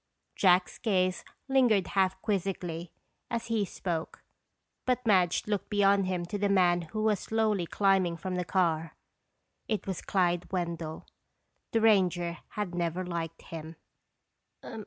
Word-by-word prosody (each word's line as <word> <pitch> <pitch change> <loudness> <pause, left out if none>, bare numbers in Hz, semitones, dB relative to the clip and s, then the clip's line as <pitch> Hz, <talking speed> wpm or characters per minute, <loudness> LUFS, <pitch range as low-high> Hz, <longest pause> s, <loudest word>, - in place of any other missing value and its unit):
Jack's 180 -1 +3
gaze 185 -5 +1 0.2
lingered 245 -8 +3
half 190 -1 +1
quizzically 180 -5 -2 0.4
as 235 0 -3
he 215 -2 +2
spoke, 170 -3 -4 0.6
but 250 -1 0
Madge 185 -5 +3
looked 205 -2 -2
beyond 200 -2 +3
him 180 -2 -1
to 205 +4 -4
the 205 0 +1
man 180 -3 +4
who 215 +6 -4
was 215 -3 +2
slowly 215 -5 0
climbing 190 -4 +2
from 185 +3 -4
the 180 0 -1
car. 165 -3 0 0.7
It 215 -2 -2
was 190 -3 -3
Clyde 175 -2 0
Wendell. 170 -3 -3 0.7
The 225 - +2
ranger 180 -5 +3
had 205 -4 -4
never 175 +1 -1
liked 165 -2 -5
him. 160 0 -8
185 Hz, 135 wpm, -29 LUFS, 175-205 Hz, 0.7 s, man